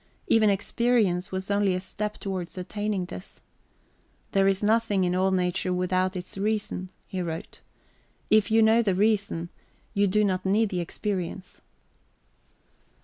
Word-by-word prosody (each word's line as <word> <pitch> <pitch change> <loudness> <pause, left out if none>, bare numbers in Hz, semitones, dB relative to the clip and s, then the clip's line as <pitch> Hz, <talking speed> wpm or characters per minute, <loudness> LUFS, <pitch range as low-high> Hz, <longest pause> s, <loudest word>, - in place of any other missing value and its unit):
Even 220 -2 +4
experience 205 -2 +1
was 190 +1 -3
only 200 -2 +2
a - - -1
step 210 +3 -5
towards 185 -2 -5
attaining 205 +1 -2
this. 185 +1 -9 0.9
"There 195 0 +3
is 195 +1 +1
nothing 215 -2 +2
in 180 0 +1
all 185 +1 +2
nature 185 0 0
without 185 +1 0
its 180 +1 -6
reason," 205 -3 -1 0.2
he 185 - -4
wrote. 165 -2 -6 0.7
"If 215 +1 +5
you 225 0 +5
know 220 +1 +5
the 200 -5 +1
reason, 200 -4 +1 0.4
you 200 0 +3
do 210 +3 +2
not 185 -2 0
need 205 +3 +2
the 180 - -2
experience." 185 +1 -4
195 Hz, 145 wpm, -26 LUFS, 185-210 Hz, 0.9 s, If